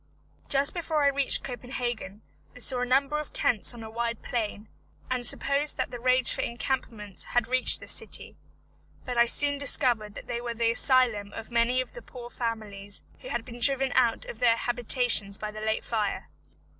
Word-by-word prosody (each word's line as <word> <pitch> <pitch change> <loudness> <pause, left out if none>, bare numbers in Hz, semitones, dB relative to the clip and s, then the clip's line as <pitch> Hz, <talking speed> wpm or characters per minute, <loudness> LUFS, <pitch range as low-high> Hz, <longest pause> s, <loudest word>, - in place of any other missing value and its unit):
Just 280 0 +1
before 320 -4 -1
I 280 - +5
reached 280 -1 +3
Copenhagen 245 -5 -5 0.3
I - - -12
saw 250 0 +3
a 250 - -1
number 275 +4 +2
of 300 - -7
tents 220 -5 +3
on 230 - -9
a 220 - -8
wide 235 0 -3
plain, 215 -3 -4 0.4
and 250 -1 -1
supposed 280 +5 +3
that - - -2
the 245 - -6
rage 255 +1 +3
for - - -3
encampments 235 -5 -4
had 245 -2 0
reached 255 +1 +5
this - - -6
city; - - -4 0.7
but 250 - -4
I 235 0 +5
soon 285 +4 +3
discovered 235 -6 +2
that - - -9
they 235 0 -4
were 235 -1 -4
the 230 0 +1
asylum 235 -5 +2
of 225 - -8
many 240 +2 +2
of 255 - -8
the - - -10
poor 245 - -11
families 210 -4 -5 0.2
who - - -10
had 235 - -3
been 240 -1 -10
driven 270 +1 +2
out 235 -3 +2
of 220 - -9
their 235 -2 +4
habitations 240 -4 +1
by 215 0 -5
the 215 0 -8
late 220 0 -1
fire. 215 -3 -2
240 Hz, 190 wpm, -27 LUFS, 225-255 Hz, 0.7 s, I